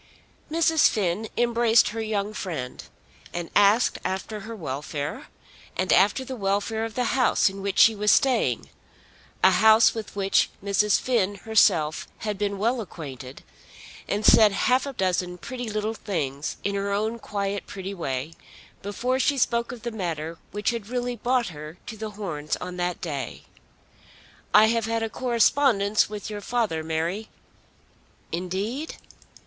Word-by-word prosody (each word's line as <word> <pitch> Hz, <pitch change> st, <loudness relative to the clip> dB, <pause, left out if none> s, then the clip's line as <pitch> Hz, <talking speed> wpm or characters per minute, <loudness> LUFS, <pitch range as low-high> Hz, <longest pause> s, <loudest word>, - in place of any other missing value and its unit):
Mrs. 320 Hz, 0 st, +4 dB
Finn 205 Hz, +1 st, -1 dB
embraced 235 Hz, -1 st, +4 dB
her 225 Hz, +2 st, -4 dB
young 215 Hz, -1 st, -2 dB
friend, 155 Hz, -12 st, -5 dB, 0.5 s
and 175 Hz, -1 st, -4 dB
asked 205 Hz, +4 st, +4 dB
after 190 Hz, +3 st, -3 dB
her 220 Hz, +3 st, -8 dB
welfare, 145 Hz, -3 st, -5 dB, 0.5 s
and 185 Hz, 0 st, +2 dB
after 205 Hz, +8 st, +3 dB
the 260 Hz, -, -5 dB
welfare 205 Hz, +1 st, -1 dB
of 225 Hz, -, -7 dB
the 250 Hz, -, +1 dB
house 250 Hz, -6 st, +3 dB
in 195 Hz, 0 st, -8 dB
which 200 Hz, 0 st, -3 dB
she 225 Hz, -, +7 dB
was 210 Hz, 0 st, +2 dB
staying, 175 Hz, -, +2 dB, 0.8 s
a 190 Hz, -, +7 dB
house 220 Hz, +3 st, +6 dB
with 220 Hz, -3 st, -7 dB
which 195 Hz, -1 st, +2 dB
Mrs. 200 Hz, +1 st, +2 dB
Finn 205 Hz, -6 st, +1 dB
herself 175 Hz, -7 st, +2 dB
had 210 Hz, -1 st, -3 dB
been 200 Hz, -1 st, -1 dB
well 230 Hz, +4 st, 0 dB
acquainted, 135 Hz, -, -9 dB, 0.6 s
and 205 Hz, +1 st, -1 dB
said 215 Hz, -2 st, +7 dB
half 255 Hz, +7 st, +2 dB
a 275 Hz, -, -5 dB
dozen 180 Hz, -4 st, -1 dB
pretty 245 Hz, +4 st, -6 dB
little 215 Hz, +1 st, -2 dB
things 150 Hz, -10 st, -3 dB
in 200 Hz, -, -1 dB
her 200 Hz, 0 st, -2 dB
own 220 Hz, +3 st, -1 dB
quiet 200 Hz, -2 st, -3 dB
pretty 195 Hz, 0 st, -6 dB
way, 140 Hz, -4 st, -4 dB, 0.5 s
before 250 Hz, +6 st, -1 dB
she 280 Hz, +1 st, +2 dB
spoke 235 Hz, -2 st, +1 dB
of 235 Hz, -2 st, -9 dB
the 235 Hz, -, -3 dB
matter 165 Hz, -6 st, -4 dB
which 210 Hz, +4 st, -1 dB
had 230 Hz, -4 st, -5 dB
really 245 Hz, 0 st, -2 dB
brought 245 Hz, -1 st, 0 dB
her 155 Hz, +1 st, -9 dB
to 220 Hz, -, -7 dB
The 220 Hz, 0 st, -5 dB
Horns 155 Hz, -7 st, -3 dB
on 180 Hz, 0 st, -7 dB
that 180 Hz, 0 st, -2 dB
day. 150 Hz, -7 st, -5 dB, 1.1 s
"I 215 Hz, -, +7 dB
have 230 Hz, 0 st, +1 dB
had 225 Hz, 0 st, -1 dB
a 225 Hz, -, -3 dB
correspondence 235 Hz, -4 st, +2 dB
with 210 Hz, -2 st, -6 dB
your 205 Hz, -1 st, -5 dB
father, 215 Hz, -8 st, -1 dB
Mary." 165 Hz, +7 st, -2 dB, 1.0 s
"Indeed." 195 Hz, -, -3 dB
205 Hz, 155 wpm, -25 LUFS, 180-230 Hz, 1.1 s, she